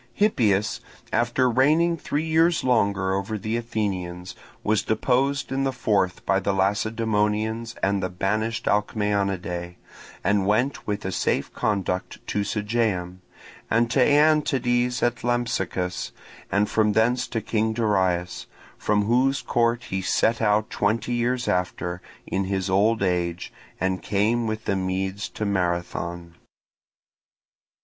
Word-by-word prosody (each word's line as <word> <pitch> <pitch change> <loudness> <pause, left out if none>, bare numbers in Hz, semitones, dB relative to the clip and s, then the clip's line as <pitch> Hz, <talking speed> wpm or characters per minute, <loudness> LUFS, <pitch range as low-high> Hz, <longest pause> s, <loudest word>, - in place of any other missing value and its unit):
Hippias, 110 - +2 0.3
after 120 +2 +2
reigning 155 +8 +3
three 150 -1 -2
years 165 +1 +2
longer 100 -6 +2
over 100 +3 -2
the 110 +3 -3
Athenians, 95 -6 -3 0.3
was 110 0 +2
deposed 135 +5 0
in 135 +1 0
the 135 - +1
fourth 100 -7 0
by 95 - +2
the 100 0 0
Lacedaemonians 110 +2 0
and 100 0 +2
the 95 - -1
banished 105 +5 -1
Alcmaeonidae, 100 -4 -1 0.5
and 100 -1 +2
went 120 +7 0
with 105 -1 -2
a 95 - -1
safe - - -1
conduct 95 -3 -1
to 105 - -1
Sigeum, 105 -4 -1 0.5
and 115 +1 +2
to 135 - +2
Aeantides 130 -4 +3
at 120 0 0
Lampsacus, 95 -7 -1 0.4
and 100 +1 +2
from 105 -1 +2
thence 120 +4 +2
to 115 - -2
King 110 +1 0
Darius; 95 -6 0 0.3
from 105 0 +1
whose 130 +5 +2
court 120 0 +1
he 95 0 -1
set 115 +4 +1
out 105 0 +2
twenty 110 +4 0
years 120 +1 0
after, 90 0 -1 0.2
in 95 0 -1
his 95 0 -2
old 105 +3 +3
age, 90 -2 -1 0.3
and 95 0 -1
came 110 +3 +1
with 110 +1 -4
the 100 - +1
Medes 95 +2 -2
to 105 - -4
Marathon. 85 -2 -2
105 Hz, 130 wpm, -24 LUFS, 95-120 Hz, 0.5 s, reigning